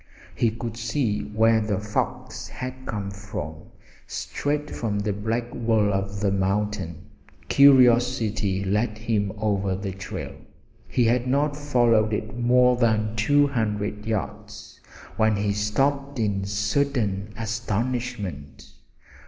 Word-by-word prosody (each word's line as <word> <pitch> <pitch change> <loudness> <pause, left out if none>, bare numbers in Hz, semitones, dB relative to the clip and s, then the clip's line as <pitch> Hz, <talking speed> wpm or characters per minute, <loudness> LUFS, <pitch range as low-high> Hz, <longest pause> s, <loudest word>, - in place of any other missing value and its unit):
He 115 - +2
could 115 0 -6
see 115 -2 -1
where 110 +1 +3
the 105 -2 -1
fox 105 +2 -3
had 130 0 -7
come 100 -2 -3 1.0
straight 150 +1 -3
from 105 -3 -2
the 100 0 -1
black 115 +4 -2
wall 110 -3 +2
of 100 +1 -2
the 100 -2 +2
mountain. 95 -3 -1 0.4
Curiosity 120 -7 +4
led 105 +3 0
him 110 -3 -1
over 100 -3 0
the 100 0 -4
trail. 95 0 -6 0.5
He 125 - +1
had 120 +2 +2
not 145 +3 +1
followed 120 -7 +2
it 110 +1 -3
more 125 +1 +4
than 110 -2 +1
two 145 +7 +4
hundred 105 -5 -2
yards 105 -1 -5 0.4
when 110 -1 +3
he 100 0 0
stopped 135 +7 0
in 100 -4 0
sudden 105 -1 0
astonishment. 115 - -3
110 Hz, 120 wpm, -25 LUFS, 105-120 Hz, 1.0 s, Curiosity